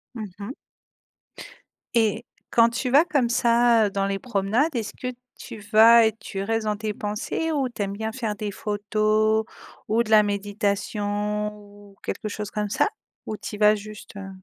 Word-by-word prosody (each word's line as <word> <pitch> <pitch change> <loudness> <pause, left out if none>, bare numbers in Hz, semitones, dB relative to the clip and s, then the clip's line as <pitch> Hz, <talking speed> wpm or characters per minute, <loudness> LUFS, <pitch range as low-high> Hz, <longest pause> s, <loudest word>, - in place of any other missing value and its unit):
Mmh 220 - -5 0.2
mh. 205 +5 -5 1.4
Et 225 0 +2 0.3
quand 230 0 +5
tu 240 +2 -2
vas 290 +4 +7
comme 280 -7 +1
ça, 235 -2 +4
dans 195 0 -1
les 195 0 -2
promenades, 235 +7 0
est-ce 225 -4 -3
que 250 - -4 0.3
tu 225 - -9
vas 225 +1 +8
et 220 - +3
tu 195 -3 -5
restes 225 +1 -1
dans 210 - 0
tes 215 -1 -3
pensées 210 +11 -3
ou 275 -4 0
tu 225 - -7
aimes 200 0 -2
bien 220 +2 -3
faire 220 -4 -3
des 205 0 -4
photos 215 +1 +1 0.4
ou 225 +2 +2
de 220 - -7
la 215 -1 +8
méditation 205 +1 -1
ou 205 -1 -16
quelque 215 - -4
chose 210 0 -5
comme 210 -1 -2
ça 310 - +2 0.4
ou 215 - -4
tu 210 +1 -7
y - - -7
vas 210 0 +5
juste, 210 0 -10
heu? 195 -1 -7
215 Hz, 180 wpm, -24 LUFS, 205-230 Hz, 1.4 s, vas